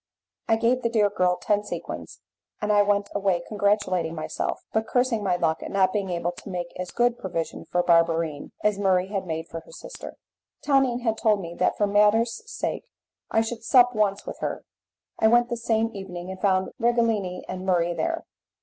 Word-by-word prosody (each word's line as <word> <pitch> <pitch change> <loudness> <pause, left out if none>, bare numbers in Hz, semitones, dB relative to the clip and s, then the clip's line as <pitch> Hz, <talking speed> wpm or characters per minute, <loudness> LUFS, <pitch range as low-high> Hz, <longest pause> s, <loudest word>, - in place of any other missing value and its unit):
I 225 - +4
gave 240 +3 +2
the 235 - 0
dear 210 -3 +2
girl 180 -2 +2
ten 205 0 0
sequins, - - -7 0.4
and 210 0 +1
I 205 - +6
went 200 0 +1
away 195 -4 +1
congratulating 200 -5 0
myself, 155 - -3
but 220 0 0
cursing 245 -3 +1
my 185 -3 +2
luck 160 -2 0
at - - -6
not 190 -1 +2
being 200 -2 -1
able 175 0 -1
to 180 +3 -11
make 175 -2 -4
as 180 -1 -4
good 240 0 +1
provision 165 -3 -4
for 175 0 0
Barberine 165 -3 +2
as 210 -1 +2
Murray 190 -1 +2
had 195 -2 -3
made 160 0 -3
for 165 - -6
her - - -17
sister. - - -9 0.5
Tonine 265 -4 +2
had 225 -2 0
told 215 -2 +3
me 170 -3 -6
that - - +2
for 205 - +3
manners' 210 +3 +3
sake - - -3 0.4
I 225 - +3
should 225 0 -4
sup 245 +1 +5
once 205 -2 0
with - - -7
her. - - -3 0.6
I 220 - +5
went 240 +2 +4
the 235 - -1
same 225 -1 0
evening 185 -2 -7
and 190 - -9
found 190 -2 +2
Righelini 230 -6 +1
and 185 0 -5
Murray 175 -2 +1
there. 330 - -2
205 Hz, 195 wpm, -25 LUFS, 180-225 Hz, 0.6 s, I